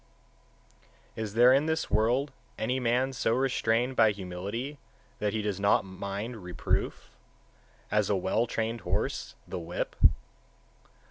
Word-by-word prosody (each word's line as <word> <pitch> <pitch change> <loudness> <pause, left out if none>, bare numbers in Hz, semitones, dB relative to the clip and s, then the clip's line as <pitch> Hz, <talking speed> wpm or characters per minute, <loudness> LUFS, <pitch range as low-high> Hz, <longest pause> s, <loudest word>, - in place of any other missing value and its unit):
Is 110 -2 -4
there 120 +2 +7
in 140 +3 +3
this 160 0 -1
world 125 +6 +2 0.3
any 125 +4 0
man 125 +2 +1
so 115 -2 +1
restrained 125 -1 +1
by 110 -2 +6
humility 100 +8 -5 0.4
that 105 -1 0
he 110 0 -2
does 100 -2 -2
not 100 -1 +3
mind 100 +5 -5
reproof, 90 -3 -2 0.8
as 105 -1 +2
a 105 - +3
well 95 +5 +1
trained 115 0 -2
horse - - -2
the - - -4
whip? 85 +1 -4
110 Hz, 130 wpm, -29 LUFS, 100-125 Hz, 0.8 s, there